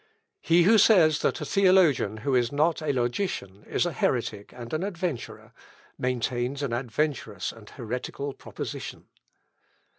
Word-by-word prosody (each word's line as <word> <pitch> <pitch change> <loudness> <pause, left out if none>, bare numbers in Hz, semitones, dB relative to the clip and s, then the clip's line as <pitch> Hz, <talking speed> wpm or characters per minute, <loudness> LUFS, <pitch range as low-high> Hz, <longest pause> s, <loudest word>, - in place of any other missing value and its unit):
"He 170 - +4
who 220 +5 +6
says 165 -9 +5
that - - 0
a - - -3
theologian 185 - +3
who 140 - +1
is 120 -2 +2
not 155 +3 +1
a 155 -2 0
logician 120 - -2
is - - 0
a 175 - -1
heretic 115 -7 -1
and 120 +1 -9
an 155 - 0
adventurer, 180 - -4 0.4
maintains 125 +2 -2
an 130 -4 -2
adventurous 120 - -2
and 110 -2 -14
heretical 125 +3 -5
proposition. - - -7
140 Hz, 140 wpm, -26 LUFS, 120-165 Hz, 0.4 s, who